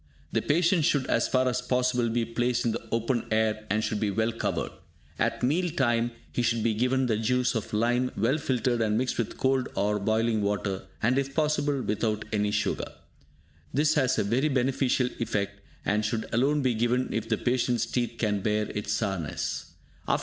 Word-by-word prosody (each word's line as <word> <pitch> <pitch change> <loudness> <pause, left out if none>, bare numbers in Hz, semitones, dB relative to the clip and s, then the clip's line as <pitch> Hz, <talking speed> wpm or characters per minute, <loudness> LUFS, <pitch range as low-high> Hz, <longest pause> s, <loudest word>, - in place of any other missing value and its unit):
The 115 - +1
patient 170 - +2
should, 145 -4 +2
as - - +1
far 130 0 +2
as 125 - 0
possible, 125 -1 +1
be 115 0 0
placed 120 +1 0
in 115 - +2
the - - -3
open 115 +1 0
air, 110 -1 0
and 110 +2 +1
should 110 - -1
be 105 - 0
well 110 +3 +1
covered. 115 - -2 0.5
At - - 0
meal 170 +8 +2
time, 120 -5 +1 0.2
he - - -1
should 115 -2 +1
be 115 -1 +2
given 125 +4 +1
the 110 -3 +1
juice 125 +3 +1
of 115 -4 -3
lime, 120 +4 +1
well 125 +9 +2
filtered 125 -3 0
and 110 -1 +2
mixed 125 +1 -1
with 115 - -2
cold 130 -1 +1
or 105 +1 +1
boiling 110 +1 +1
water, 100 -2 -2 0.2
and 125 +4 +3
if 135 0 -4
possible, 145 -3 +1
without 105 0 -1
any 105 -1 +1
sugar. 105 0 -1 0.8
This 150 +2 +3
has 130 -4 +2
a - - +2
very 120 +9 +1
beneficial 130 -1 +1
effect, 100 -3 -2 0.2
and 105 +1 +1
should 110 0 -1
alone 140 +5 +2
be 130 -2 +2
given 120 +3 0
if 115 0 -2
the 110 - +2
patient's 125 -2 +1
teeth 120 0 -2
can 105 -3 0
bear 105 +1 0
its 105 0 -3
sourness. 95 -8 -3
115 Hz, 185 wpm, -27 LUFS, 110-130 Hz, 0.8 s, and